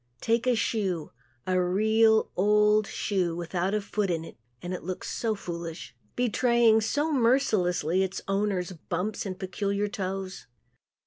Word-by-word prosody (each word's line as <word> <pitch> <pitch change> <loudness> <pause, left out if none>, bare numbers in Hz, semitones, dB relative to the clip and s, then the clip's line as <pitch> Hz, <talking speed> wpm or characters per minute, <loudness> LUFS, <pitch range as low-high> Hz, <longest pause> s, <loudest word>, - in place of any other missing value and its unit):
Take 230 - 0
a 250 - +4
shoe 190 -8 -1 0.3
a 185 0 +1
real, 220 +4 +3
old 210 +2 +3
shoe 185 -5 -1
without 175 +3 -2
a 210 - 0
foot 200 0 -2
in 165 -2 -1
it - - -11 0.2
and 175 +5 -5
it 180 - -4
looks 185 +1 -5
so 225 -2 -1
foolish, 170 -3 -7 0.2
betraying 235 -2 +3
so 290 +8 0
mercilessly 205 - +2
its 190 0 -2
owner's 195 -2 0
bumps 185 +5 -4
and 185 -1 -5
peculiar 200 +2 -2
toes. 190 -3 -5
195 Hz, 140 wpm, -27 LUFS, 180-220 Hz, 0.3 s, a